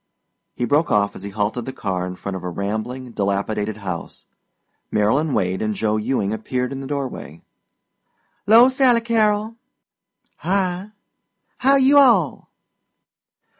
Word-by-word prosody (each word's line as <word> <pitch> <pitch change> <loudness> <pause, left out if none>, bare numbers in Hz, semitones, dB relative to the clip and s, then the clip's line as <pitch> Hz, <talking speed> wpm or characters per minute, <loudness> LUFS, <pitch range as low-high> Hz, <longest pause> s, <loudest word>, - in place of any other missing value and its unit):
He 120 - -1
broke 150 +5 +2
off 100 -1 +1
as - - -9
he 100 - -6
halted 105 +4 -2
the - - -3
car 95 -7 -3
in 90 - -6
front 100 +1 -6
of 95 - -5
a 90 - -4
rambling, 110 +7 -4
dilapidated 105 +1 -2
house. 90 -3 -6 0.7
Marylyn 130 +9 +1
Wade 95 -2 -1
and 110 -1 -1
Joe 110 0 0
Ewing 110 -2 -1
appeared 125 +4 -3
in 135 - -5
the 135 - -7
doorway. 130 - -5 1.0
"'Lo 230 +4 +8
Sally 260 -3 +3
Carrol." 220 -1 0 0.8
"Hi!" 185 +1 -1 0.7
"How 275 +2 +4
you 275 +1 +5
all?" 220 - +3
125 Hz, 135 wpm, -21 LUFS, -, 1.0 s, Lo